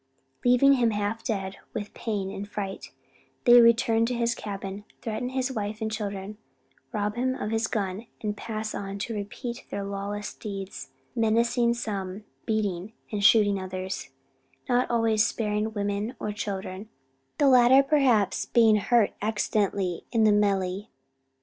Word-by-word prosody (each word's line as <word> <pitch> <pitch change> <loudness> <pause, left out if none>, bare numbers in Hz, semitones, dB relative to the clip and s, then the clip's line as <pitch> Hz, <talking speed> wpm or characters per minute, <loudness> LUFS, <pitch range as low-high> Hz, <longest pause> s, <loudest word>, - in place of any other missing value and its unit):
Leaving 250 +3 +6
him 245 -4 +3
half 210 +1 -2
dead 195 -4 -3 0.2
with 205 -1 -4
pain 205 -4 -3
and 200 +1 -6
fright, 195 -2 -5 0.5
they 240 0 +9
return 230 -1 +4
to 245 +2 0
his 235 0 +1
cabin, 200 -1 -6 0.2
threaten 230 +1 -3
his 260 0 -1
wife 215 -3 -3
and 220 -1 -2
children, 205 -1 -5 0.5
rob 210 -1 -1
him 255 +2 0
of 215 - -4
his 225 0 +1
gun, 200 +1 -3
and 210 -1 -3
pass 215 0 -4
on 195 0 -5
to 220 +3 -4
repeat 235 +4 -5
their 200 - -3
lawless 200 +1 -4
deeds; 195 -7 -7 0.3
menacing 235 +1 +2
some, 200 -4 -4 0.2
beating 210 -2 -1 0.2
and 205 -2 -2
shooting 205 -2 +5
others; 185 0 -5 0.6
not 250 -1 +2
always 225 -2 +3
sparing 215 -1 -1
women 205 +3 -2
or 210 - -2
children; 200 0 -5 0.5
the 290 - +4
latter 255 +1 +7
perhaps, 270 -8 +2
being 225 -2 +5
hurt 225 0 +2
accidentally 200 -4 0
in 230 -2 +3
the 215 - +6
melee. 200 -1 +1
215 Hz, 145 wpm, -27 LUFS, 200-235 Hz, 0.6 s, they